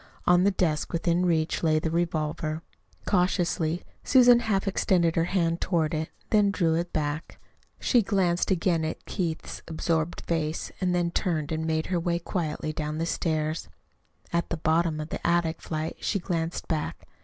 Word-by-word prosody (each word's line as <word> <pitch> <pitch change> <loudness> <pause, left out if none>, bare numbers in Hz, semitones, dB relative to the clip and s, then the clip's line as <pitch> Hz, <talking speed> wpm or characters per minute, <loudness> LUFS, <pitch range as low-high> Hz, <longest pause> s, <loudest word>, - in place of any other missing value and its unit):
On 180 0 +5
the - - +6
desk 170 -6 0
within 170 +1 +1
reach 160 -2 +1
lay 155 -2 +3
the 160 +1 -1
revolver. 160 -1 -1 0.4
Cautiously 175 -3 +1 0.2
Susan 245 -2 +6
half 210 -4 0
extended 175 -3 +2
her 165 - +2
hand 170 -2 0
toward 165 -4 +1
it, 155 0 -2 0.2
then 210 -2 +5
drew 175 -5 +1
it 170 +2 -1
back. 150 0 -3 0.4
She 245 - +4
glanced 185 -4 +1
again 170 -3 +2
at 155 - -4
Keith's 165 -4 -3
absorbed 160 0 -1
face, 160 -1 -2
then 180 -2 +1
turned 165 -5 -1
and 160 0 -1
made 160 0 0
her 175 - +2
way 170 0 0
quietly 165 -3 -3
down 150 0 -3
the 165 - -1
stairs. 155 - -1 0.6
At 170 0 0
the 170 - -2
bottom 160 0 +1
of 155 +1 -5
the - - -4
attic 170 -1 +1
flight 155 0 -4
she 205 - 0
glanced 170 -3 -3
back. 155 -2 -3
170 Hz, 165 wpm, -27 LUFS, 160-180 Hz, 0.6 s, the